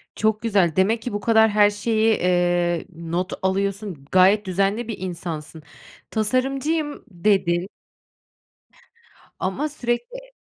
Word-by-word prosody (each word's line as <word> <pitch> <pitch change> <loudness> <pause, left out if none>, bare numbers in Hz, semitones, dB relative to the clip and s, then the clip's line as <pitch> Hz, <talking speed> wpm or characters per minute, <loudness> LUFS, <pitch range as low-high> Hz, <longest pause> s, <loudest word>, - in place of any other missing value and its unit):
Çok 215 0 +1
güzel. 195 -8 +2
Demek 220 +5 +2
ki 240 -1 -5
bu 205 - -1
kadar 220 +1 +4
her 205 0 +5
şeyi, 220 +1 +1
eee, 175 -1 +1
not 170 +3 -3
alıyorsun. 195 -4 -2
Gayet 195 +3 +5
düzenli 195 +5 0
bir 225 - -4
insansın. 165 -4 -6 0.5
Tasarımcıyım, 270 +7 -1
dedi 180 -1 +1 1.7
Ama 270 +12 -2
sürekli 290 - -4
205 Hz, 110 wpm, -22 LUFS, 180-225 Hz, 1.7 s, her